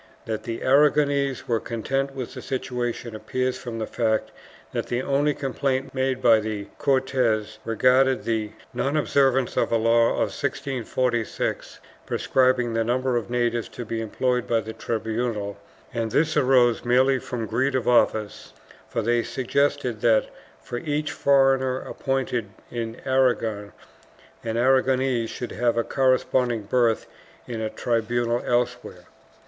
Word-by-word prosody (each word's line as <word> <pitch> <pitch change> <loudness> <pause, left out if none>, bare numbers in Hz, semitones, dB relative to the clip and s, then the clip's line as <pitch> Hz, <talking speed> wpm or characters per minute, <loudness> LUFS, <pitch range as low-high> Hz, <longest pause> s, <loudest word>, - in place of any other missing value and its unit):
That 110 -1 -3
the 115 -1 -4
Aragonese 140 -1 +3
were 115 -2 +1
content 135 +5 -2
with 130 -3 -5
the - - -7
situation 120 -3 -3
appears 130 +3 -2
from 120 -2 -6
the 110 - -2
fact 110 -1 -1 0.4
that - - -3
the 120 +1 -1
only 140 +2 +1
complaint 135 0 -2
made 130 -1 -1
by 115 -2 +6
the 105 -2 -4
Cortes 125 -6 +1
regarded 130 +3 +3
the 110 -2 -2 0.2
non 140 +3 0
observance 135 -3 +2
of - - +1
a 115 - +4
law 115 +1 +4
of - - -1
1646 125 -3 -2 0.3
prescribing 125 -2 +2
the 115 0 +1
number 125 +2 0
of 120 -1 -2
natives 120 -1 0
to 120 - -7
be 115 0 -3
employed 125 +2 -1
by 115 - +2
the 110 0 -6
tribunal, 110 -3 -3 0.3
and 115 -1 -1
this 155 +7 +1
arose 125 -3 +4
merely 130 +2 +3
from 120 -3 -4
greed 130 +5 0
of 125 -3 -1
office, 110 -3 +1 0.4
for 115 - -2
they 120 +2 +2
suggested 130 -2 -1
that, 110 -2 +3 0.3
for 120 - -5
each 150 +1 -2
foreigner 135 -2 +3
appointed 130 -5 -2 0.2
in 115 -1 -4
Aragon, 120 -6 +1 0.7
an 115 0 -2
Aragonese 130 -1 +2
should 125 - -6
have 120 0 0
a 115 - +2
corresponding 130 -3 +1
berth 115 +1 +1 0.4
in 115 -3 -4
a 110 - -1
tribunal 120 +1 0
elsewhere. 120 -6 -1
120 Hz, 140 wpm, -24 LUFS, 115-130 Hz, 0.7 s, by